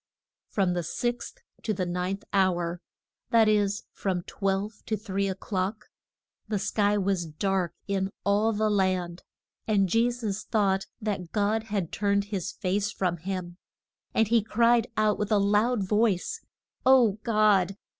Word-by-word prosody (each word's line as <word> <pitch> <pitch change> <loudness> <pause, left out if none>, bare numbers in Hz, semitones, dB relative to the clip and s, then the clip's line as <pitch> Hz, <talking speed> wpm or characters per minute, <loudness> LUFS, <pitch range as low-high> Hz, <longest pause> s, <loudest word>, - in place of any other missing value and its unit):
From 190 -3 +1
the 175 - -1
sixth 240 - -4 0.2
to 215 - -1
the 185 - -1
ninth 180 +3 -2
hour 175 -3 +1 0.5
that 225 -2 +5
is, 205 -1 +2
from 185 -3 -2
twelve 195 +3 -2
to 220 - 0
three 200 -2 -2
o'clock 190 +2 -3 0.6
the 210 -1 -1
sky 205 +1 +1
was 190 -3 0
dark 180 +1 -1
in 195 -1 0
all 205 +3 +2
the 215 0 +1
land. 185 -3 0 0.5
And 200 -3 +3
Je 230 +6 +3
sus 220 -4 -3
thought 195 -3 +1
that 195 -5 -3
God 215 +1 0
had 200 -6 -2
turned 200 -1 +1
his 185 -4 -2
face 200 +2 -1
from 180 -4 -1
him. 180 0 -5 0.5
And 225 - +2
he 230 +1 +4
cried 230 +2 +3
out 215 -1 +2
with 210 +1 -2
a 210 - +5
loud 205 +1 +2
voice 215 - +1 0.4
O 245 -6 +5
God! 205 -4 +3
200 Hz, 145 wpm, -27 LUFS, 190-215 Hz, 0.6 s, that